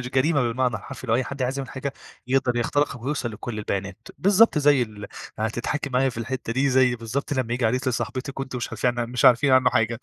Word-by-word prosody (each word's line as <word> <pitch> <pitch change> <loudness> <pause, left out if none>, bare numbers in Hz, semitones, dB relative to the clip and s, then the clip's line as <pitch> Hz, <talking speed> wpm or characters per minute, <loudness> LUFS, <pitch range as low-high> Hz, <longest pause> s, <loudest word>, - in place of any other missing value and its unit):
مش 125 - -5
جريمة 140 +2 +2
بالمعنى 125 +1 0
الحرفي 130 -1 -9
لو 115 - +2
أي 130 - +1
حد 140 -1 -5
عايز 130 +2 -1
يعمل 135 - -5
حاجة، 135 +1 -4 0.3
يقدر 130 -2 +1
يخترقك 130 +1 0
ويوصل 130 -4 -2
لكل 110 +1 -6
البيانات، 100 -2 -4
بالضبط 200 -2 +4
زي 145 -3 +4
ال 105 -3 -7 0.3
هتضحكي 120 +6 -2
معايا 130 +1 +2
في 115 -2 -6
الحتة 120 0 -4
دي 135 +3 +2
زي 125 -1 +3
بالضبط 115 +6 -4
لما 130 -4 -1
ييجي 125 0 -1
عريس 125 +3 0
لصاحبتِك، 130 +2 -3
وأنتم 130 -2 -4
مش 120 - -2
عارفين 120 +2 -1
عن 120 0 -2
مش 125 - -1
عارفين 130 +3 +6
عنه 130 -1 +5
حاجة، 115 +1 0
125 Hz, 220 wpm, -24 LUFS, 120-135 Hz, 0.3 s, عارفين